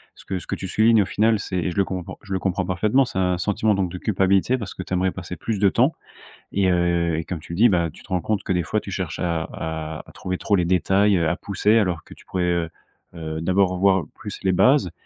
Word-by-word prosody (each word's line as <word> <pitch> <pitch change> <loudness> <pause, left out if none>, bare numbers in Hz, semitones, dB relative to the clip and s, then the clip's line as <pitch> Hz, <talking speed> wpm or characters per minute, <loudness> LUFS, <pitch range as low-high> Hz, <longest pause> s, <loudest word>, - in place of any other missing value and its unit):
ce - - -15
que 95 - -3
ce - - -13
que - - -2
tu 95 - -6
soulignes 110 +1 +4
au - - -5
final, 110 +4 +2
c'est 90 -2 -2
je - - -8
le 100 - +4
compr 90 -2 -5
je 105 - -13
le 95 - 0
comprends 95 0 -1
parfaitement. 105 +9 +2
C'est 110 -7 -4
un 90 -1 +1
sentiment 105 +3 +1
donc 95 -3 -1
de 90 - -5
culpabilité, 100 +4 +2
parce 105 -6 -6
que 95 - -6
tu 95 - -6
aimerais 90 0 +1
passer 90 -1 -7
plus 105 +4 -3
de 100 - +5
temps. - - +2 0.6
Et 95 -1 +2
heu 85 -2 +1
et 80 - -3
comme 85 -2 -5
tu 80 - -10
le - - -5
dis, 120 +3 +7
bah 85 -4 +1
tu - - -15
te - - -17
rends 90 -1 0
compte 105 +2 -1
que, - - 0
des 90 -1 +1
fois, 110 - -1
tu 100 - -8
cherches 90 -5 -3
à 85 -2 0
à 80 -1 -5
à - - -13
trouver 90 0 -4
trop 105 - 0
les 90 - +1
détails, 95 +3 +3
heu, 80 - +1
à 85 - +1
pousser 105 +2 +1
alors 90 -7 0
que - - -13
tu - - -19
pourrais, 90 -1 -1
heu 85 -2 0 0.4
heu, 80 -1 -5
d'abord 95 +2 +2
voir 95 -1 +3
plus - - -8
les 95 - +3
bases. 130 +1 +4
95 Hz, 270 wpm, -23 LUFS, 85-100 Hz, 0.6 s, dis